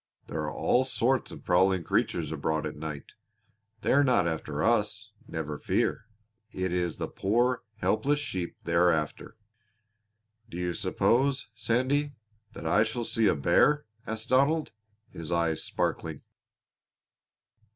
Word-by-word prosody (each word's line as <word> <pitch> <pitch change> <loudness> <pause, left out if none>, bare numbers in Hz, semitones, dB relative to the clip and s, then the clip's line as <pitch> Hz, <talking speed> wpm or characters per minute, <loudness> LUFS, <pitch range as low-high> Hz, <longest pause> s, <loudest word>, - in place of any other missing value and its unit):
"There - - -4
are - - -3
all 125 - +2
sorts 130 0 +1
of - - -10
prowling 95 0 +3
creatures - - 0
abroad 80 -1 -1
at 75 - -4
night. 75 -2 -7 0.7
They - - +2
are 140 +2 +5
not 125 -10 +3
after 75 -2 -3
us 110 -1 +1 0.2
never 75 -2 -4
fear. 110 - 0 0.4
It 95 -3 -2
is 90 -2 -1
the - - -3
poor, 120 +5 +1 0.2
helpless 140 +7 +1
sheep 95 -12 -3
they 85 - -3
are 90 +1 +5
after." 80 +6 -2 1.1
"Do 85 - -7
you 90 -1 -1
suppose, 130 +7 +1
Sandy, 130 +6 0 0.4
that - - -9
I 105 - +4
shall 110 +2 -1
see 110 -1 +2
a - - +3
bear?" 150 - +3 0.2
asked 110 0 -4
Donald, 140 +5 +3 0.4
his 80 0 -7
eyes 85 -2 +1
sparkling. - - -2
105 Hz, 140 wpm, -28 LUFS, 85-125 Hz, 1.1 s, are